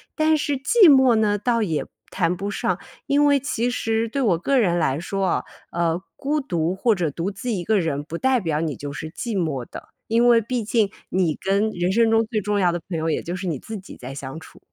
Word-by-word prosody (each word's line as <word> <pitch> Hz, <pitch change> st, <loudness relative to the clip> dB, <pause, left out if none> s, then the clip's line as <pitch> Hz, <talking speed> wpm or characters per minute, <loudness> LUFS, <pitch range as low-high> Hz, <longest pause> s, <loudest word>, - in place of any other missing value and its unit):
但 310 Hz, 0 st, +3 dB
是 290 Hz, -2 st, -1 dB
寂 370 Hz, -, +6 dB
寞 265 Hz, -3 st, +6 dB
呢， 215 Hz, -2 st, +2 dB
倒 230 Hz, +2 st, 0 dB
也 165 Hz, -8 st, -1 dB, 0.2 s
谈 175 Hz, -, 0 dB
不 200 Hz, +3 st, -4 dB
上， 205 Hz, -, -1 dB, 0.3 s
因 285 Hz, +1 st, +3 dB
为 285 Hz, -1 st, +4 dB
其 245 Hz, -3 st, -1 dB
实 225 Hz, -2 st, -1 dB
对 275 Hz, +2 st, -1 dB
我 180 Hz, -7 st, +3 dB
个 275 Hz, +7 st, +1 dB
人 175 Hz, -7 st, +2 dB
来 140 Hz, -2 st, 0 dB
说 195 Hz, +3 st, -3 dB
啊， -, -, 0 dB, 0.3 s
呃， 170 Hz, +1 st, 0 dB
孤 295 Hz, +2 st, -1 dB
独 175 Hz, -, -1 dB
或 220 Hz, +2 st, +2 dB
者 170 Hz, -4 st, -1 dB
独 170 Hz, +7 st, -3 dB
自 220 Hz, +5 st, -5 dB
一 185 Hz, -5 st, -2 dB
个 215 Hz, +1 st, +2 dB
人 145 Hz, -4 st, -1 dB
不 165 Hz, +2 st, -6 dB
代 260 Hz, +3 st, +2 dB
表 160 Hz, -7 st, -1 dB
你 160 Hz, -4 st, -2 dB
就 145 Hz, 0 st, -6 dB
是 155 Hz, +2 st, -6 dB
寂 225 Hz, +2 st, -4 dB
寞 140 Hz, -7 st, -2 dB
的， -, -, -10 dB, 0.2 s
因 230 Hz, +2 st, +3 dB
为 235 Hz, -1 st, +6 dB
毕 235 Hz, +1 st, -2 dB
竟 215 Hz, -1 st, +1 dB, 0.2 s
你 175 Hz, -4 st, +1 dB
跟 200 Hz, +3 st, 0 dB
人 175 Hz, -1 st, -1 dB
生 230 Hz, 0 st, +3 dB
中 225 Hz, 0 st, +3 dB
最 220 Hz, -1 st, -2 dB
重 205 Hz, +1 st, 0 dB
要 180 Hz, -2 st, +3 dB
的 175 Hz, -, -3 dB
朋 170 Hz, -, -2 dB
友， 160 Hz, +1 st, -1 dB
也 -, -, 0 dB
就 175 Hz, -, -4 dB
是 185 Hz, +1 st, -5 dB
你 160 Hz, -5 st, -1 dB
自 220 Hz, -, -7 dB
己 195 Hz, -, -11 dB
在 130 Hz, +2 st, -8 dB
相 135 Hz, +2 st, -7 dB
处。 160 Hz, -, -15 dB
200 Hz, 260 characters per minute, -23 LUFS, 170-235 Hz, 0.3 s, 寂